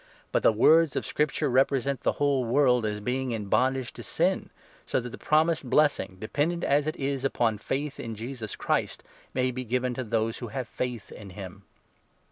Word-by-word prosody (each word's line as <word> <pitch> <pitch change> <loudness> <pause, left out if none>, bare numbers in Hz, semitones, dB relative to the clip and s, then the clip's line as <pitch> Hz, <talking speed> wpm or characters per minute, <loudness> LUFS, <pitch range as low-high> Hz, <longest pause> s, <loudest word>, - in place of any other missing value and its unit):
But - - +2
the - - +5
words 155 +7 +5
of - - -1
Scripture 150 -2 0
represent 135 +1 +2
22 - - -28
the - - +3
whole 140 -3 +2
world 125 -2 +3
as 105 0 -3
being 130 +4 -2
in 110 -2 -3
bondage 130 +1 +1
to - - -9
sin, - - 0 0.3
so - - 0
that 125 0 -6
the - - -9
promised 155 -3 +2
blessing, 145 -12 +2
dependent, 150 - -1
as 145 +1 +2
it 155 - -1
is, 135 -1 -2
upon 115 -5 +1
faith 140 +5 -3
in 115 -1 -5
Jesus 115 -1 -6
Christ, - - -1 0.3
may 130 0 +1
be 130 +1 -4
given 125 +1 -1
to 130 - -3
those 115 0 -1
who 120 - -5
have 125 +3 -4
faith 120 -2 -4
in 100 -2 -10
him. 95 0 -9
125 Hz, 195 wpm, -27 LUFS, 115-140 Hz, 0.3 s, the